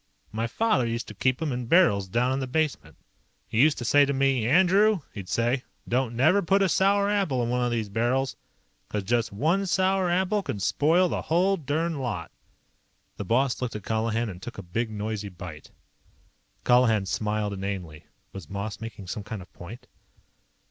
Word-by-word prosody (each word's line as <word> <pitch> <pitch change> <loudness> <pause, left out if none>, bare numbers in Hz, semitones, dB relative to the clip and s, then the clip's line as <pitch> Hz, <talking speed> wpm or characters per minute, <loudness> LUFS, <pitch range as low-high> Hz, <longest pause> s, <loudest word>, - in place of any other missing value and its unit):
My 115 +2 -2
father 175 - +1
used 115 0 -3
to - - -8
keep 130 +5 0
'em 155 - -1
in 125 -1 -4
barrels 115 - +4
down 120 +6 +1
in 135 - -1
the 130 - -3
basement. 135 - -2 0.5
He 110 - +1
used 150 +1 +4
to 120 - -5
say 145 +4 +5
to 140 0 0
me, 135 -4 +1
'Andrew,' 190 - +4
he'd 95 -4 -8
say, 120 +4 0 0.2
'don't 125 -1 0
never 160 +11 +4
put 195 +2 +2
a 190 - +2
sour 200 +3 +3
apple 190 -12 +1
in 115 - -2
one 125 0 0
of 120 - +1
these 115 -3 -1
barrels. 120 +6 0 0.5
'Cause 105 -2 -2
just 115 +3 0
one 165 - +1
sour 190 0 +2
apple 190 +4 +1
can 105 - -4
spoil 165 - +3
the - - -2
whole 185 +4 +2
derned 160 -1 -2
lot.'" 125 -4 -4 0.9
The 100 - -5
boss 130 +5 +1
looked 125 -3 -3
at 105 - -6
Colihan 115 +2 -1
and 90 -3 -8
took 120 - -8
a 100 - -6
big 110 +7 -2
noisy 105 -1 -4
bite. 85 -5 -10 0.9
Colihan 120 -5 +4
smiled 105 +2 -1
inanely. 95 -6 -5 0.3
Was 95 -6 -9
Moss 100 +1 -5
making 110 -3 -8
some 90 +4 -5
kind 110 +1 -6
of 90 - -21
point? 100 +8 -10
120 Hz, 185 wpm, -26 LUFS, 105-160 Hz, 0.9 s, say